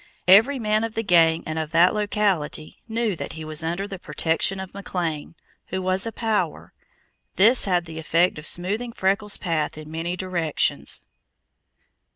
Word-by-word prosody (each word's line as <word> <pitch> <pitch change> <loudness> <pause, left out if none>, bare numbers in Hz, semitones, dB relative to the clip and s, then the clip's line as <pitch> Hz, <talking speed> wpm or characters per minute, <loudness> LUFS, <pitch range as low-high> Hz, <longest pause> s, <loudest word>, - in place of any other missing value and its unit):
Every 220 +9 +7
man 215 -2 +1
of 225 0 -4
the 225 - -1
gang 165 -4 +4
and 155 0 -3
of 155 -1 -3
that 170 +2 +5
locality 205 -7 -1
knew 225 -3 -1
that - - -6
he 160 0 -7
was 155 0 -3
under 175 +5 -2
the 195 -2 -7
protection 175 +3 -1
of 190 -1 -7
McLean, 170 -6 -4 0.3
who 190 - -3
was 185 +3 0
a - - -3
power, 220 -2 -2 0.6
this 230 +6 +5
had 180 -3 +1
the 160 -1 -7
effect 165 +1 +2
of 150 - -8
smoothing 210 +7 -1
Freckles' 200 +1 0
path 155 -4 -2
in 155 0 -9
many 170 +2 -3
directions. 175 -4 -1
185 Hz, 165 wpm, -24 LUFS, 165-210 Hz, 0.6 s, Every